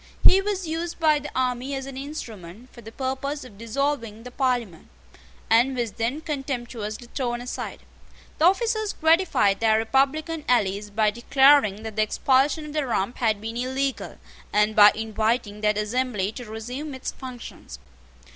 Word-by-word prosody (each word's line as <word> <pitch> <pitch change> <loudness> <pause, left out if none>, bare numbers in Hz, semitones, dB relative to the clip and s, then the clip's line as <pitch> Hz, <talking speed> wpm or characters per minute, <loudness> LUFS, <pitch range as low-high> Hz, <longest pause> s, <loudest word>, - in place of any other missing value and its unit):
He 385 - +7
was 390 -2 -2
used 330 +2 -4
by 310 -2 +4
the 295 +1 -7
army 255 +1 -1
as 270 0 -4
an 275 -1 -8
instrument 240 - -8
for 235 - -12
the 225 0 -10
purpose 265 +3 -3
of 210 -6 -14
dissolving 230 -2 -2
the 250 - -9
Parliament, 245 - -1 0.6
and 245 +4 +3
was 235 -3 -1
then 240 +9 -2
contemptuously 245 -7 -5
thrown 240 -3 -2
aside. 245 +1 -6 0.6
The 315 - +4
officers 435 +2 +2
gratified 315 - +3
their 220 -1 +3
republican 275 +7 0
allies 205 -3 +1
by 210 0 +2
declaring 240 -2 +4
that 220 -1 -7
the - - +3
expulsion 270 +7 +2
of 300 - -8
the 300 -3 -1
Rump 230 0 -1
had 220 -4 +1
been 225 +2 -5
illegal, 260 +2 -2 0.3
and 210 +1 +2
by 205 0 +9
inviting 220 0 -1
that 210 -1 +2
assembly 210 -2 -1
to 245 +2 -8
resume 250 +7 -6
its 260 - -4
functions. 245 - -9
250 Hz, 155 wpm, -24 LUFS, 220-280 Hz, 0.6 s, by